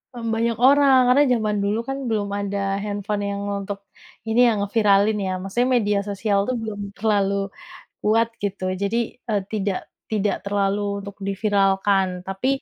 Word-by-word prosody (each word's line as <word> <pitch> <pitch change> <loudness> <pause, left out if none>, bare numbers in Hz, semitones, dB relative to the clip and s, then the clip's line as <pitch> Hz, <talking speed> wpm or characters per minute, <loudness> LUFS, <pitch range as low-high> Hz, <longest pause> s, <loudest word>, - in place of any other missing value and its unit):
Mmm, 230 -1 -4
banyak 230 0 0
orang, 275 0 +6
karena 280 +3 +6
jaman 215 -3 0
dulu 205 +2 0
kan 270 - -2
belum 205 -2 -1
ada 200 0 -3 0.3
handphone 205 0 -3
yang 200 0 -3 0.2
untuk, 200 0 -5 0.5
ini 225 +2 +2
ya 235 - +5
ngeviralin 205 0 +3
ya. 190 -2 -2
Maksudnya 240 +7 0
media 205 -2 +1
sosial 200 0 0
tuh 255 - 0
belum 215 -2 -5 0.2
terlalu 200 -2 +1 0.7
kuat 225 +2 +3
gitu, 200 -1 -3 0.2
jadi 200 +3 0 0.3
e 215 - +1 0.2
tidak 200 -3 -1 0.3
tidak 210 -1 +1
terlalu 200 0 0 0.2
untuk 200 0 -9
di 200 - 0
viralkan. 195 -2 +2 0.2
tapi 195 +6 -3
205 Hz, 155 wpm, -23 LUFS, 200-225 Hz, 0.7 s, orang